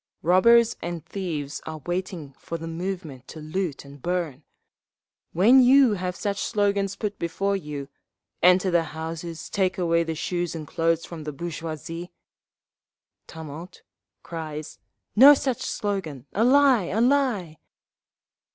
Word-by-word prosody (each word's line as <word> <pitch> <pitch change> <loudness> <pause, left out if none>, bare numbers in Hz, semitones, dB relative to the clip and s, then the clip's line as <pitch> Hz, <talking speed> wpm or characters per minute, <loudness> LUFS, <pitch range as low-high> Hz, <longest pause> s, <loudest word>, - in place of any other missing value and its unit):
Robbers 230 +7 +5
and 170 -2 -5
thieves 155 -7 -4
are 160 0 -5
waiting 175 -5 -4
for 165 - -5
the 165 - -7
moment 165 -6 -5
to 160 - -9
loot 155 -1 -4
and 140 0 -13
burn…. 170 -5 -2 0.9
When 230 +10 +6
you 255 -2 +6
have 180 -2 -3
such 200 -1 -3
slogans 200 -2 0
put 210 -2 -4
before 195 +4 -1
you, 150 -6 -5 0.5
'Enter 180 +1 +5
the 170 -1 +4 0.2
houses, 165 0 -6
take 190 -2 0
away 170 -2 +2
the 165 -1 -4
shoes 175 +1 -2
and 155 -2 -6
clothes 165 +1 0
from 165 -3 -8
the 150 - -4
bourgeoisie—'" 165 +2 -6 1.2
(Tumult. 160 +2 -10 0.4
Cries, 155 -2 -7 0.4
"No 275 +6 +9
such 260 -3 -2
slogan! 180 - -3
A 220 - +2
lie! 260 -4 +5
A 200 +5 -2
lie!") 235 - +1
175 Hz, 135 wpm, -25 LUFS, 160-200 Hz, 1.2 s, No